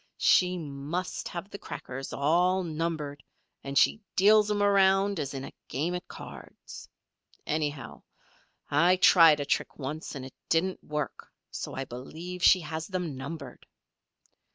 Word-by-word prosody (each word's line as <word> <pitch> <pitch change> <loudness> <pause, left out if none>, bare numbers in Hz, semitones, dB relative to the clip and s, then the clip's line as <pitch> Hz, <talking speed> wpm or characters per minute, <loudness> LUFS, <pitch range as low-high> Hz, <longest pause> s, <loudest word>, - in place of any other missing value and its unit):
"She 180 0 +4
must 150 +3 -4
have 180 +3 -7
the 200 - -7
crackers 135 +1 -7
all 180 +6 +2
numbered 155 -3 -3 0.4
and 140 0 -3
she 220 - +4
deals 210 +2 +5
'em 205 -1 +1
around 195 -1 +3
as 140 -2 -3
in 135 - -4
a - - -10
game 155 +7 -2
at 180 - -5
cards. - - -11 0.6
Anyhow, 150 -2 -3 0.7
I 170 +6 +5
tried 165 -4 +7
a 145 - -2
trick - - -1
once 150 +3 -5
and 130 -2 -6
it 130 - -11 0.2
didn't 180 +3 +1
work, 150 -1 -5 0.2
so - - -6
I 135 - -3
believe 160 +9 -8
she 185 0 +6
has 160 0 -5
them 180 -6 -3
numbered." 135 -1 -8
165 Hz, 145 wpm, -28 LUFS, 145-185 Hz, 0.7 s, tried